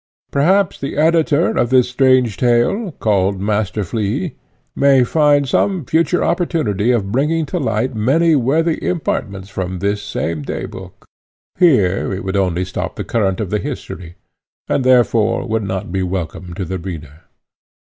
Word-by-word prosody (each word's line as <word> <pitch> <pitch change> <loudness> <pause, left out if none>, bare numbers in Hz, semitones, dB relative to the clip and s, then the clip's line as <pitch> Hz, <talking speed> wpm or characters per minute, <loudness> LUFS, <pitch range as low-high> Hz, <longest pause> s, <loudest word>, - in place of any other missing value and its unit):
Perhaps 185 +7 +2
the 140 - -5
editor 160 +1 +3
of 120 - 0
this 130 -1 +4
strange 125 -3 +2
tale, 125 - +1
called 100 -4 0
Master 105 0 -1
Flea, 115 - -2 0.4
may 135 -2 +4
find 145 +1 +3
some 185 +3 0
future 165 +4 +1
opportunity 155 - 0
of 105 -6 +1
bringing 150 +6 +1
to 180 +5 -3
light 130 -2 -1
many 150 +9 +2
worthy 155 +5 +1
impartments 100 - -2
from 95 -2 -4
this 100 +2 -1
same 80 -5 -3
day 70 - -4
book; - - -11 0.5
here 105 - +3
it 95 0 -4
would 95 +1 -3
only 90 -2 0
stop 95 - -5
the - - -4
current 95 -5 0
of 105 -5 -3
the 105 - 0
history, 95 - -7 0.5
and, 135 - 0
therefore, 120 -4 +2
would 110 0 0
not 95 -2 -4
be 95 +1 -1
welcome 90 -1 -4
to 95 - -4
the 95 +2 -4
reader. 80 -4 -9
115 Hz, 155 wpm, -18 LUFS, 95-145 Hz, 0.5 s, this